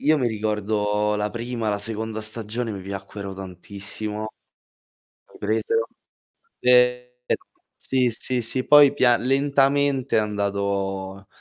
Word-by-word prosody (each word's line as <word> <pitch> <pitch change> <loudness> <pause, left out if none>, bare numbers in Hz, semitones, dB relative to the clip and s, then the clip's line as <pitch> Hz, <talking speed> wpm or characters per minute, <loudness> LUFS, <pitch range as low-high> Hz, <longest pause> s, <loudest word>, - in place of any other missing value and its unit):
Io 155 +1 +3
mi 125 -3 +1
ricordo 105 -1 0
la 105 0 -1
prima, 115 -2 -3
la 100 - -1
seconda 110 +1 -4
stagione, 110 +2 -4
mi 95 -2 -6
piacquero 100 0 -6
tantissimo 100 +3 -6 1.0
mi - - -15
presero. 115 - 0 0.7
Ehm, 125 0 +4 0.7
sì, 130 -2 +1
sì, 125 +2 0
sì, 130 +3 +1
poi 145 -1 +7
pia 120 -4 +4
lentamente 140 0 +2
è - - +5
andato 100 -2 -2
110 Hz, 115 wpm, -23 LUFS, 100-125 Hz, 1.0 s, poi